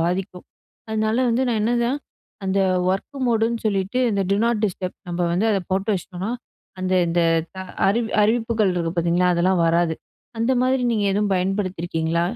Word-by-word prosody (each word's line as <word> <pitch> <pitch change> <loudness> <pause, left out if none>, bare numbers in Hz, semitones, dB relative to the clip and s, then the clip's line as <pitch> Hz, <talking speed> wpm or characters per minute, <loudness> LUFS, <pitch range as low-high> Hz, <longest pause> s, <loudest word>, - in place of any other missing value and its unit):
பாதிக்கும். 180 +2 -2 0.4
அதனால 220 +1 0
வந்து 245 +3 +1
நான் 225 -3 +1
என்னதான் 240 +4 +1 0.5
அந்த 195 +1 +1 0.3
ஒர்க் 235 +9 -3
மோடு 225 -2 +2
ன்னு 230 - -4
சொல்லிட்டு 200 +4 0
இந்த 200 -1 +1
டு - - +3
நாட் 230 -2 0
டிஸ்டப் 185 -1 -5
நம்ம 175 0 -4
வந்து 195 +6 +1
அத 195 - +1
போட்டு 195 +3 0
வச்சிட்டோம்னா, 185 +3 -5 0.5
அந்த 185 0 0
இந்த 170 +1 +1 0.7
அறி 215 +4 +2 0.2
அறிவிப்புகள் 225 -3 +1
இருக்கு 170 -1 -1
பார்த்தீங்களா? 175 +2 +2
அதெல்லாம் 175 0 +2
வராது. 165 0 +2 0.4
அந்த 230 +3 +2
மாரி 260 0 +2
நீங்க 210 -2 0
எதுவும் 205 +1 +1
பயன்படுத்திருக்கீங்களா? 175 -3 -1
195 Hz, 155 wpm, -22 LUFS, 180-225 Hz, 0.7 s, டு